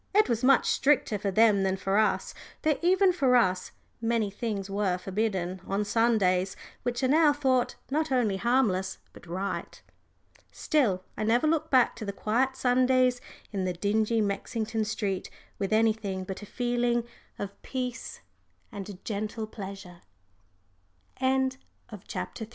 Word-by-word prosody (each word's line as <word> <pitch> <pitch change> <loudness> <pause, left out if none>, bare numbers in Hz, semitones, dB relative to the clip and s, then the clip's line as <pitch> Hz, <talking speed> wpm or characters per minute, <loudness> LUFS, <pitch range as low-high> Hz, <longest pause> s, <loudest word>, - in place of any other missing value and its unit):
It 425 - +5
was 235 -1 -1
much 265 0 +5
stricter 270 -7 +2
for 200 0 -1
them 210 0 +4
than 190 0 0
for 195 +2 +1
us, 215 - +1 0.3
though 310 -1 +3
even 370 +2 +4
for 270 -7 +3
us 185 -6 +2 0.3
many 225 -3 0
things 205 -2 -3
were 195 -2 0
forbidden 190 -2 -2
on 200 +2 -1
Sundays 200 -4 +2 0.3
which 245 +1 -2
are - - +4
now 300 +2 +5
thought 260 -4 +1 0.2
not 310 +1 0
only 230 -7 +2
harmless 210 -5 +1 0.2
but - - -15
right. 185 +4 -4 0.7
Still, 220 - +1
I - - -3
never 235 +6 +2
look 315 0 +1
back 255 -3 +4
to - - -6
the 200 - -2
quiet 250 +7 0
Sundays 255 0 +3 0.3
in 195 -3 -2
the 180 - -1
dingy 215 +5 +1
Mexington 220 +2 -2
street 205 -3 -2 0.3
with 195 0 -2
anything 215 -3 +1
but 190 +2 -6
a 205 - -9
feeling 240 0 0 0.3
of 200 0 -7
peace 250 -3 -5 0.5
and 195 -1 -8
gentle 215 +1 -3
pleasure. 195 -4 -9 2.1
CHAPTER 225 - -5
IV. - - -23
220 Hz, 145 wpm, -28 LUFS, 195-250 Hz, 2.1 s, It